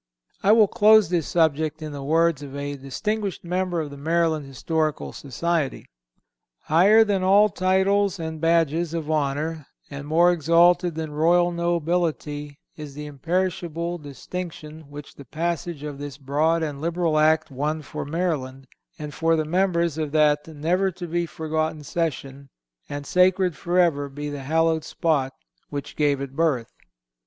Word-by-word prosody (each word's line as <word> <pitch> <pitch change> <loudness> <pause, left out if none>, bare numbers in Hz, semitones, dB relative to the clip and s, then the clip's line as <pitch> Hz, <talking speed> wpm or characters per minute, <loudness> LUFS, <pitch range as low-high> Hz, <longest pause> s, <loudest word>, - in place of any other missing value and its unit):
I 200 - +4
will 220 -1 +6
close 215 -2 +5
this 175 -4 0
subject 155 -2 +1
in 155 - -5
the 145 -1 -7
words 160 +1 +2
of 140 -1 -8
a 145 0 -4
distinguished 195 +9 -3
member 180 0 -1
of 150 -2 -6
the 140 - -9
Maryland 160 -1 0
Historical 155 +3 -2
Society: 150 +2 -2 0.8
"Higher 195 +8 +5
than 200 -3 0
all 200 +3 +5
titles 195 +1 +1
and 160 -1 -5
badges 165 0 +1
of 160 -2 -3
honor, 150 +1 -1 0.2
and 140 0 -7
more 170 +3 +4
exalted 170 +1 +3
than 160 -1 -4
royal 175 +3 +3
nobility 170 -4 -2 0.2
is 150 -3 -9
the 150 0 -6
imperishable 170 +3 -2
distinction 155 +1 -8
which 145 0 -10
the 140 - -13
passage 165 +1 -3
of 145 -2 -6
this 145 -1 -7
broad 155 +4 +1
and 145 -3 -4
liberal 165 -1 0
Act 155 0 +3
won 150 +4 -2
for - - -6
Maryland, 145 -5 -3 0.3
and 150 -1 -7
for 165 0 +2
the 155 -1 0
members 170 -2 0
of 155 -2 -2
that 150 -1 +3
never 165 +5 0
to 180 -1 -7
be 170 0 -2
forgotten 155 -1 -3
session, 140 -4 -4 0.4
and 145 0 -5
sacred 180 0 +3
forever 170 -4 +1
be 145 +1 -6
the 145 -1 -6
hallowed 160 +2 +1
spot 145 -5 -1 0.3
which 145 -1 -6
gave 145 -2 +1
it 135 -1 -6
birth." 145 -8 0
160 Hz, 150 wpm, -24 LUFS, 145-175 Hz, 0.8 s, will